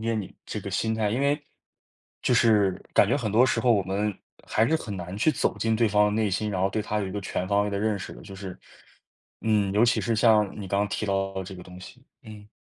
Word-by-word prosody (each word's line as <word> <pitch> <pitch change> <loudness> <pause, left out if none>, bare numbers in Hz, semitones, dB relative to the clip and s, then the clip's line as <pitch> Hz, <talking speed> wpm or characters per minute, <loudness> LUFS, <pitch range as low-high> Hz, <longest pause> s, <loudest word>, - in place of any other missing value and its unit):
解 115 - +1
你 105 -4 -4
这 - - -4
个 - - -6
心 110 0 0
态， 110 -2 0
因 120 - -1
为 145 +2 +1 0.8
就 - - +2
是 105 -6 +3
感 100 - +6
觉 120 - +2
很 110 -7 -2
多 115 +4 +5
时 130 - +1
候 120 -2 +4
我 100 - +2
们 100 +2 -2 0.3
还 110 - +2
是 160 - +3
很 105 -10 -6
难 90 +2 -6
去 155 +7 +3
走 - - -1
进 115 0 +1
对 115 0 +2
方 105 0 +4
的 - - +1
内 110 -2 +1
心， 105 +3 -1
然 95 -3 -2
后 95 - +2
对 110 - -1
他 105 0 -2
有 100 - -2
一 - - -6
个 105 - -4
全 95 -1 -3
方 100 0 +2
位 105 - -2
的 100 - -2
认 105 0 0
识 85 - -7
的， - - -12
就 95 - -10
是 95 -2 -7 0.8
嗯， 105 -3 +1
尤 105 +3 +4
其 120 +1 +2
是 115 - 0
像 110 -2 +4
你 95 - -6
刚 100 - 0
刚 105 0 +1
提 110 - -3
到 95 -1 -1
这 95 0 -9
个 90 - -10
东 90 0 -12
西， 125 +7 -13 0.2
嗯。 105 -2 -12
105 Hz, 290 characters per minute, -26 LUFS, 95-110 Hz, 0.8 s, 感